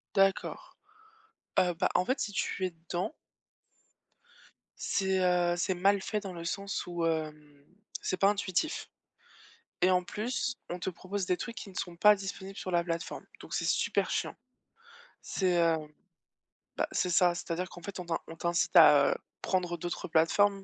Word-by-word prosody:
D'accord, 195 0 +1 0.8
heu, 180 -1 +3
bah, 180 +2 +1
en 180 - +3
fait, 260 +2 +1
si 205 - -2
tu 190 -1 -2
es - - 0
dedans 175 - -4 1.7
c'est, 190 -1 +1
heu, 175 -1 +3
c'est 185 +2 +1
mal 195 +2 +3
fait 210 +1 -2
dans 195 -3 -7
le 170 -1 -7
sens 195 +3 -3
où, 175 -1 -2
hem, 150 -3 -3 0.4
c'est 185 - -1
pas 195 - +5
intuitif. 205 - -1 0.9
Et 185 +1 +5
en 180 0 +3
plus, 245 +5 -2
on 175 - -4
te 190 - -2
propose 185 +2 -4
des 180 -1 +2
trucs 230 -1 -6
qui 205 - -7
ne 185 - -15
sont 175 -2 -4
pas 210 +2 +7
disponibles 195 0 -7
sur 185 - -4
la 170 0 +3
plateforme. 165 -1 -4 0.2
Donc - - -10
c'est - - 0
super - - +1
chiant. - - -1 0.9
C'est, 180 -2 +1
heu 165 -1 +4 1.0
bah, - - +1
c'est 180 - 0
ça, 175 0 +4
c'est-à-dire 175 +1 -3
qu'en 175 - -11
fait, 200 0 -7
on 180 - -5
t'in 165 - 0
on 165 - -8
t'incite 170 +2 0
à 150 -4 +7 0.2
prendre 175 -2 0
d'autres 175 +2 -4
plateformes, 195 +5 +3
180 Hz, 170 wpm, -30 LUFS, 170-195 Hz, 1.7 s, pas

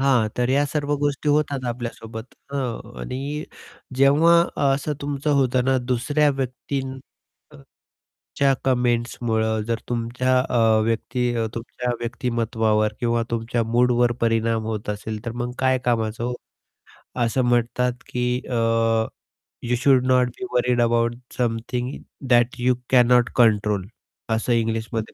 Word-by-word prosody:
हां, 130 -5 +3
तर 125 0 +1
या 140 +2 +3
सर्व 145 0 -1
गोष्टी 145 0 -1
होतात 145 -3 +1
आपल्यासोबत, 115 -1 -6 0.3
हां 120 -4 -4
आणि 140 +4 -4 0.5
जेव्हा 150 +5 +5 0.3
असं 140 +2 -1
तुमचं 145 +1 -2
होतं 125 -1 +1
ना 135 0 +3
दुसऱ्या 130 +4 +1
व्यक्तीं 135 +1 -3 0.7
अ, - - -13 0.8
...च्या 140 -1 +3
कमेंट्समुळं 120 -3 0
जर 115 - +1
तुमच्या 125 +2 0
अ, 115 -2 +3
व्यक्ती 120 +2 -1
अ, 115 -1 0
तुमच्या 125 +1 -4
व्यक्तिमत्त्वावर 115 -3 0
किंवा 120 -1 +1
तुमच्या 115 0 -1
मूडवर 120 +1 +2
परिणाम 115 -1 +1
होत 110 -2 -4
असेल, 105 +1 -4
तर 115 - -2
मग 120 +1 -4
काय 130 0 +3
कामाचं 115 -2 0
हो! 125 +1 -1 0.9
असं 115 +3 0
म्हणतात 120 +1 +1
की 125 0 -2 0.2
अ, - - -5 1.1
you 120 +1 0
should 130 -2 +4
not 125 -1 +4
be - - -5
worried 125 0 +2
about 115 0 +2 0.2
something 120 +1 -2 0.4
that 120 0 +4
you 125 +1 +2
cannot 125 -1 +5
control 105 -5 +3 0.5
असं 115 +2 -1
इंग्लिशमध्ये 115 -1 -2
120 Hz, 130 wpm, -23 LUFS, 115-130 Hz, 1.1 s, जेव्हा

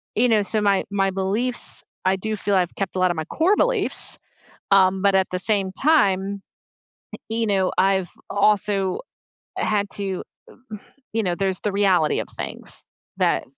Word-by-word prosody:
you 245 +3 +4
know, 220 -3 +4
so, 210 +2 0
my 200 -2 +2
my 195 -1 +1
beliefs, 205 +6 -2 0.2
I 190 +1 +3
do 215 +3 -3
feel 200 -1 0
I've 180 -2 +1
kept 195 -2 -3
a - - -1
lot 185 -1 +3
of 170 - -4
my 160 - -2
core 365 - +2
beliefs, - - 0 0.5
um, 190 -1 +5
but 200 -1 +3
at 190 -1 +3
the 180 - -2
same 195 -2 0
time, 200 -8 +2 0.8
eh - - -8
you 225 0 -1
know, 195 -2 +2
I've 190 -2 +2 0.2
also 200 -2 +1 0.6
had 205 -2 0
to, 195 -2 -3 0.9
you 225 - 0
know, 180 -4 0
there's 190 -1 -1
the 210 - -2
reality 190 -6 +2
of - - -6
things - - -6 0.4
that, - - +2
195 Hz, 170 wpm, -23 LUFS, 190-210 Hz, 0.9 s, um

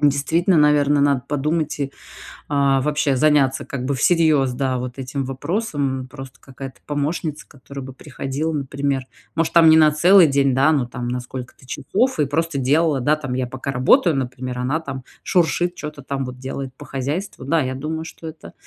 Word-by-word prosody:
Действительно, 155 +5 +2
наверно, 145 -1 +4
надо 140 -2 +2
подумать 150 +1 -1
и, 140 -1 -2 0.6
а, 140 -2 +2
вообще 145 -1 +1
заняться 140 -1 +3
как 140 -3 -5
бы 140 +1 0
всерьез, 155 -4 +3
да, 130 0 -1
вот 125 +1 -6
этим 135 +1 -3
вопросом, 140 - -2
м. 130 - -9
Просто 135 -1 -11
какая-то 135 0 -10
помощница, 150 +1 -3
которая 140 0 -10
бы 130 0 -9
приходила, 140 +3 -4
например, 140 -2 -2 0.3
может 165 0 0
там 165 -2 +7
не 160 - +7
на 155 -1 +7
целый 175 +4 +6
день, 140 -1 +2
да, 135 +4 +4
но 140 -5 +1
там 120 0 -6
на 125 +1 -2
сколько-то 125 +1 -9
часов 230 - -1
и 150 - +3
просто 160 +1 -1
делала, 145 +2 +2
да 150 +5 +3
там. 140 -4 -5
Я 125 0 -1
пока 130 +2 -5
работаю, 155 - +4
например, 125 -1 -4
она 135 +6 0
там 140 -5 -7 0.2
шуршит, 175 0 +1
чё-то 150 -3 -7
там 135 0 -3
вот 125 0 -7
делает 130 0 -6
по 145 - -11
хозяйству. 140 +5 -4
Да, 160 +5 +1
я 130 -1 -2
думаю, 160 +4 -4
что 165 - -9
это. 160 0 -10
140 Hz, 185 wpm, -21 LUFS, 130-155 Hz, 0.6 s, там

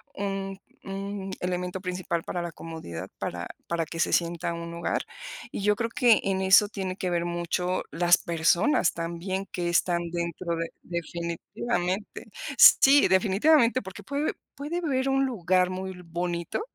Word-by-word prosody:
un 195 -1 -3 0.3
un 195 0 -5
elemento 180 0 -2
principal 180 -2 -2
para 175 - -3
la 170 -1 -5
comodidad, 160 - -7
para 85 0 -4 0.2
para 170 -1 -1
que 165 +1 -7
se - - +1
sienta 170 0 0
un 170 0 -6
hogar. 170 0 -1 0.5
Y - - -4
yo 210 +1 +4
creo 230 +2 -2
que 235 0 +4
en 195 -1 0
eso 190 +2 +6
tiene 190 -3 -4
que 185 - -2
ver 170 -1 0
mucho 175 +1 -1
las 175 +1 +4
personas 170 - +2
también 170 +3 -3
que 175 -1 -2
están 170 0 +2
dentro 170 0 -2
de 165 0 -3
definitivamente, 175 +4 -3 0.3
sí, 275 -6 +8
definitivamente, 230 +7 +4
porque 190 +1 -10
puede 285 +7 -1 0.2
puede 300 +5 -3
ver 270 -4 0
un 270 0 +2
lugar 185 -7 +1
muy 190 +1 -4
bonito, 170 - -3
180 Hz, 150 wpm, -27 LUFS, 170-200 Hz, 0.5 s, sí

